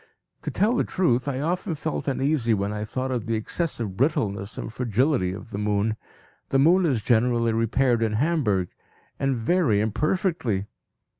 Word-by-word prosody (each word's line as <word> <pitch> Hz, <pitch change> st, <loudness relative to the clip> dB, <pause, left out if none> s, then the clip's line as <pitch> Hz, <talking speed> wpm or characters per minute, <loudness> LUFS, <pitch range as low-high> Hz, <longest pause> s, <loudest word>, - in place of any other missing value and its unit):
To -, -, -4 dB
tell 220 Hz, +5 st, +2 dB
the -, -, +2 dB
truth, 135 Hz, -9 st, +1 dB
I 135 Hz, -1 st, -1 dB
often 175 Hz, +2 st, -1 dB
felt 155 Hz, 0 st, -4 dB
uneasy 135 Hz, -4 st, +1 dB
when 100 Hz, +1 st, -2 dB
I 105 Hz, 0 st, -3 dB
thought 130 Hz, +4 st, -3 dB
of 120 Hz, -3 st, -2 dB
the 115 Hz, -, 0 dB
excessive 110 Hz, -, -3 dB
brittleness 110 Hz, -6 st, -1 dB
and -, -, -5 dB
fragility 125 Hz, -3 st, +1 dB
of 105 Hz, +4 st, -9 dB
the 100 Hz, -, -4 dB
moon. 105 Hz, +1 st, 0 dB, 0.5 s
The 135 Hz, -, +2 dB
moon 170 Hz, +6 st, +5 dB
is 125 Hz, -8 st, 0 dB
generally 115 Hz, 0 st, +2 dB
repaired 115 Hz, +2 st, +2 dB
in 110 Hz, -1 st, +1 dB
Hamburg, 110 Hz, -, +1 dB, 0.5 s
and 135 Hz, -1 st, +1 dB
very 120 Hz, -, +2 dB
imperfectly. 120 Hz, -, 0 dB
120 Hz, 160 wpm, -25 LUFS, 110-150 Hz, 0.5 s, moon